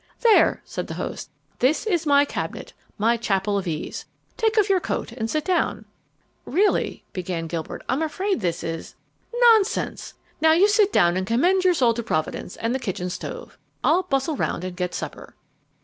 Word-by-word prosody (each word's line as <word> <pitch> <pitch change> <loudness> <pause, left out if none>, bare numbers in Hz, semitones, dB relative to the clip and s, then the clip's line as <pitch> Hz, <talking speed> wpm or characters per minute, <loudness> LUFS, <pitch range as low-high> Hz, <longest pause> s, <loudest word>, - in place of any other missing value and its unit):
"There," 460 -3 +4
said - - -5
the - - -6
host; - - -5 0.3
"this 285 - +2
is 345 -7 0
my 285 0 +5
cabinet, - - -5 0.2
my 230 +2 +2
chapel 200 -2 0
of 190 - -6
ease. 155 -2 -4 0.3
Take 445 0 0
off 420 -2 +4
your 390 -2 +3
coat 330 - -3
and 225 -2 -4
sit 305 +3 -1
down." 370 -2 0 0.6
"Really," 405 +3 +1
began 175 -2 -3
Gilbert, 165 -1 -5
"I'm 260 +5 0
afraid 375 +4 -1
this 175 -5 -2
is 165 0 -5 0.2
" - - -41 0.2
"Nonsense! 440 -1 0 0.3
Now 320 0 +6
you 365 +5 +5
sit 415 -1 +3
down 175 - +3
and 185 0 -2
commend 355 - +3
your 365 -1 +4
soul 245 -6 +3
to 235 - -3
Providence 155 -2 -3
and 230 +2 -2
the 265 - -1
kitchen 180 -6 -3
stove. - - -7 0.2
I'll 365 - +4
bustle 300 -2 -1
round 180 - -2
and 185 -1 -5
get 180 -1 -3
supper." - - -7
260 Hz, 180 wpm, -23 LUFS, -, 0.6 s, Now